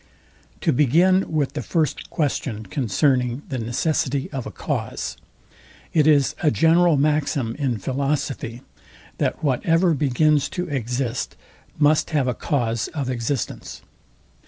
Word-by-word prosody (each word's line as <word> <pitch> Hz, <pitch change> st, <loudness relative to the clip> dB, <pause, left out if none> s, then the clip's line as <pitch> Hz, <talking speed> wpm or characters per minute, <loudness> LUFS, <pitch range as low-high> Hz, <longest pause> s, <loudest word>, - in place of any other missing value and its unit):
To -, -, +2 dB
begin 170 Hz, +9 st, +3 dB
with 145 Hz, -3 st, 0 dB
the 150 Hz, -, -3 dB
first 160 Hz, -4 st, -1 dB
question 135 Hz, -7 st, -2 dB
concerning 125 Hz, +3 st, 0 dB
the 130 Hz, -3 st, -3 dB
necessity 135 Hz, +3 st, -1 dB
of 135 Hz, -5 st, -4 dB
a -, -, -7 dB
cause: -, -, -3 dB, 0.8 s
It 155 Hz, -2 st, +4 dB
is 145 Hz, -4 st, +4 dB
a 155 Hz, -, +4 dB
general 165 Hz, +1 st, +4 dB
maxim 145 Hz, -5 st, +1 dB
in 130 Hz, -5 st, 0 dB
philosophy, 135 Hz, 0 st, -2 dB, 0.6 s
that -, -, -1 dB
whatever 165 Hz, +5 st, +2 dB
begins 145 Hz, +1 st, +2 dB
to 180 Hz, 0 st, -1 dB
exist, 125 Hz, -2 st, -2 dB, 0.4 s
must 150 Hz, 0 st, +3 dB
have 145 Hz, -4 st, +1 dB
a 125 Hz, -, +1 dB
cause 115 Hz, -5 st, -1 dB
of 135 Hz, -4 st, -2 dB
existence. 120 Hz, +1 st, -4 dB
140 Hz, 125 wpm, -23 LUFS, 125-155 Hz, 0.8 s, It